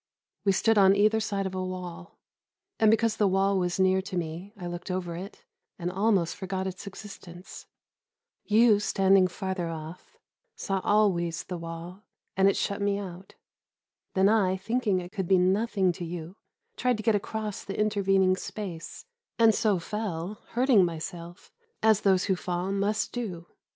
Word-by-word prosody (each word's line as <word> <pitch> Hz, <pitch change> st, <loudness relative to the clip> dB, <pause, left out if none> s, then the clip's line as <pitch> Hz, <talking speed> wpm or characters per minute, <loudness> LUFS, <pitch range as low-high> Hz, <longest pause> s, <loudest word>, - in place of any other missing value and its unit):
We 200 Hz, -, +5 dB
stood 225 Hz, +3 st, +3 dB
on 195 Hz, 0 st, +6 dB
either 215 Hz, +2 st, +3 dB
side 200 Hz, -2 st, -2 dB
of 190 Hz, -, -4 dB
a 185 Hz, 0 st, -2 dB
wall, 180 Hz, -1 st, -7 dB, 0.6 s
and 220 Hz, -, +5 dB
because 225 Hz, 0 st, +2 dB
the 210 Hz, -, +3 dB
wall 195 Hz, +1 st, +2 dB
was 180 Hz, 0 st, -1 dB
near 190 Hz, 0 st, +3 dB
to 190 Hz, -1 st, -5 dB
me 170 Hz, +4 st, -4 dB
I 180 Hz, -, -7 dB
looked 175 Hz, +1 st, -6 dB
over 180 Hz, -2 st, -3 dB
it 190 Hz, +4 st, -9 dB, 0.3 s
and 175 Hz, 0 st, -3 dB
almost 195 Hz, -3 st, +1 dB
forgot 190 Hz, -1 st, -4 dB
its 190 Hz, +1 st, -6 dB
existence. 195 Hz, -3 st, -10 dB, 0.8 s
You, 215 Hz, 0 st, +5 dB
standing 195 Hz, -2 st, +4 dB
farther 185 Hz, -1 st, -3 dB
off, 165 Hz, +1 st, -8 dB, 0.4 s
saw 195 Hz, -1 st, -2 dB
always 175 Hz, -6 st, +2 dB
the 180 Hz, -2 st, -6 dB
wall, 165 Hz, +3 st, -8 dB, 0.3 s
and 195 Hz, 0 st, +5 dB
it -, -, 0 dB
shut 200 Hz, 0 st, -2 dB
me 200 Hz, 0 st, +1 dB
out. 190 Hz, -1 st, -8 dB, 0.8 s
Then 190 Hz, +1 st, +4 dB
I, 200 Hz, -3 st, +3 dB
thinking 210 Hz, -1 st, 0 dB
it 175 Hz, 0 st, -8 dB
could 195 Hz, -4 st, -3 dB
be 190 Hz, -, +5 dB
nothing 190 Hz, +1 st, +2 dB
to 175 Hz, -, -7 dB
you, 170 Hz, +1 st, -6 dB, 0.4 s
tried 250 Hz, -2 st, +1 dB
to 215 Hz, -, -6 dB
get 225 Hz, -, +3 dB
across 210 Hz, 0 st, -3 dB
the 195 Hz, -, -6 dB
intervening 195 Hz, -3 st, +3 dB
space, 185 Hz, -, -7 dB, 0.3 s
and 225 Hz, -1 st, +6 dB
so 210 Hz, -3 st, +2 dB
fell, 195 Hz, 0 st, -4 dB
hurting 240 Hz, -4 st, +4 dB
myself, 170 Hz, +1 st, -6 dB, 0.3 s
as 220 Hz, -1 st, +4 dB
those 190 Hz, -2 st, +3 dB
who 190 Hz, -, +1 dB
fall 180 Hz, +1 st, -3 dB
must 205 Hz, +2 st, 0 dB
do. 190 Hz, -9 st, -5 dB
190 Hz, 165 wpm, -27 LUFS, 180-210 Hz, 0.8 s, on